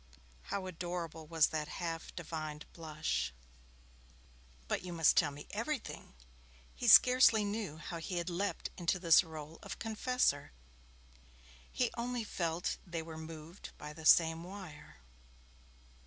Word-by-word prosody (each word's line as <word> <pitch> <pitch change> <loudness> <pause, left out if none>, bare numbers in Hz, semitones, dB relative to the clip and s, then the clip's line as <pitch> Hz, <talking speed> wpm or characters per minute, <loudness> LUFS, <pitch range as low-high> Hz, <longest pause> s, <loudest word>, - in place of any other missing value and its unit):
How 195 -2 -3
adorable 170 -3 -5
was 160 -1 +3
that 155 -1 -2
half 165 -2 -5
divined 155 -3 -5
blush! 155 - -2 1.4
'But - - -1
you 180 -1 -6
must 165 -2 +4
tell 155 - +4
me 145 +1 -10
everything.' 230 - -4 0.6
He 245 - -4
scarcely 235 -2 +8
knew 205 -6 -3
how 165 +1 -6
he 175 +2 -4
had 170 0 -2
leapt 190 +3 -2
into 175 0 +1
this 170 -1 +6
role 160 -1 -9
of - - -7
confessor. 225 - 0 1.2
He 245 -2 0
only 245 0 -2
felt 170 -4 -2
they 170 -3 -4
were 160 0 -8
'moved 160 +2 -9
by 150 0 -8
the 155 +1 -3
same 165 0 +6
wire'. 180 - -10
170 Hz, 130 wpm, -34 LUFS, 160-200 Hz, 1.4 s, scarcely